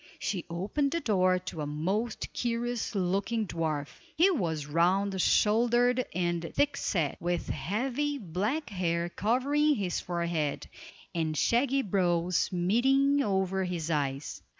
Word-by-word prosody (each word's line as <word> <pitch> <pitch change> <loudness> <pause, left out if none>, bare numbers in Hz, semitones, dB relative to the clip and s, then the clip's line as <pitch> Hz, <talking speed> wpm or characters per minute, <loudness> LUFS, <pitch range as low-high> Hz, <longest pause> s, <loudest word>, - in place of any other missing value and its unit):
She 195 -3 -3
opened 200 - -1
the 335 - +1
door 185 - +2
to 180 -3 -6
a 145 - -3
most 190 +10 -2
curious 240 -1 -2
looking 200 +4 0
dwarf. 155 -5 -3 0.2
He 365 +5 +5
was 165 - -1
round 185 +5 +1
shouldered 240 +5 +3
and 175 -1 0
thick 285 0 +2
set, 165 - -1
with 175 0 -2
heavy, 250 - -1
black 210 - -2
hair 170 -2 -1
covering 280 +10 +2
his 195 -6 -1
forehead, 170 -4 -2 0.5
and 160 -2 -1
shaggy 270 - +2
brows 180 -3 +1
meeting 265 +10 +3
over 190 -4 0
his 170 -3 -3
eyes. 140 -2 -2
190 Hz, 125 wpm, -29 LUFS, 170-240 Hz, 0.5 s, He